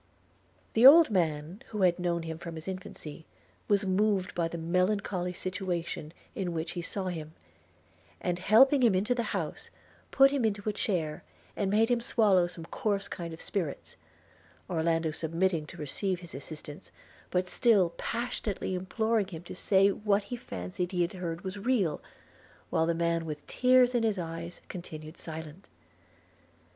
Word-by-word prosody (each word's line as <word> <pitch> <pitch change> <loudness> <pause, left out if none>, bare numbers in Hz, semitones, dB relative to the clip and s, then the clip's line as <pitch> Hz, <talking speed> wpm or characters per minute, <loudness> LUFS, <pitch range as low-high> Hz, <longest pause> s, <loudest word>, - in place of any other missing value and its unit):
The 225 - +3
old 300 +1 +10
man, 165 - -1
who 210 -3 -2
had 180 -1 +3
known 170 -1 0
him 160 0 -5
from 170 -1 -7
his 160 +2 -8
infancy, 180 -5 -7 0.4
was 200 -1 +3
moved 190 0 +1
by 170 -1 0
the 170 - -6
melancholy 180 +2 0
situation 180 -4 -4 0.2
in 180 -3 -3
which 165 +1 -3
he 175 - -4
saw 185 +2 -3
him; 160 -3 -6 0.8
and, 175 0 -2
helping 260 +9 +6
him 230 -6 +5
into 205 +6 +2
the 245 - -1
house, - - -4 0.4
put 270 0 +6
him 280 -3 0
into 205 -1 -1
a 210 - +1
chair, 170 -9 -2 0.3
and 200 - 0
made 220 +3 +3
him 240 -1 +2
swallow 205 -7 +4
some 170 -2 -8
coarse 200 +2 -1
kind 170 -1 -6
of 160 - -9
spirits 170 -8 -3 0.4
– 80 +1 -30
Orlando 165 -1 +1
submitting 165 0 -1
to - - -11
receive 180 +5 -2
his 170 -1 -11
assistance, 150 +1 -9 0.4
but 180 0 0
still 195 -4 +3
passionately 230 -3 -3
imploring 215 +3 0
him 170 -4 -8
to - - -8
say 195 +1 +4
if 200 - -2
what 205 -1 +1
he 225 +5 -5
fancied 175 - -5
he 175 -1 +2
had 170 - -3
heard 170 -2 -4
was 190 +1 -5
real, 200 - +1 0.7
while 160 - +2
the 170 - +1
man 170 0 0
with 150 -2 -6
tears 250 0 +4
in 240 - +2
his 220 -3 +1
eyes 170 0 -6
continued 155 -3 -8
silent. 160 +2 -9
180 Hz, 165 wpm, -30 LUFS, 165-205 Hz, 0.8 s, old